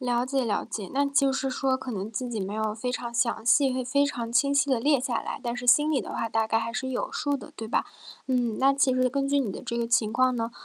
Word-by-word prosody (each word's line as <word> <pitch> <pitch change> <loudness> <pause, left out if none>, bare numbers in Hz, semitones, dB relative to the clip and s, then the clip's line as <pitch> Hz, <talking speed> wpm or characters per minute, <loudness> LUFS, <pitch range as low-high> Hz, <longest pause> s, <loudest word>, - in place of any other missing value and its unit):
了 245 -1 0
解 265 -1 0
了 210 - 0
解， 200 -4 -6
那 280 +1 +2
就 280 -1 +2
是 270 0 -1
说， 265 0 0
可 260 -1 -6
能 200 -1 -4
自 235 +3 -4
己 225 -3 -3
没 195 +1 -4
有 215 0 -1
非 235 +3 -4
常 240 -1 -4
详 235 -2 0
细 270 +2 +4
会 255 0 -2
非 280 +3 +2
常 235 -5 -4
清 280 +3 +2
晰 280 0 +3
地 260 -3 +2
列 285 +4 +3
下 250 -1 -2
来， - - -6
但 235 -1 -2
是 245 0 -6
心 295 +5 +5
里 285 - +2
的 - - -6
话 230 - -2
大 225 0 0
概 225 - +2
还 225 +1 -2
是 260 +2 -3
有 260 -1 -3
数 285 -2 -1
的， - - -9
对 225 - -5
吧？ - - +1 0.4
嗯， 245 -4 0
那 270 +1 +5
其 275 -1 +2
实 255 0 +2
根 275 +2 -1
据 285 0 +2
你 240 -7 -1
的 - - -7
这 235 - -4
个 235 - 0
情 230 -2 +1
况 255 +1 +3
呢， 230 0 -2
250 Hz, 310 characters per minute, -26 LUFS, 230-270 Hz, 0.4 s, 心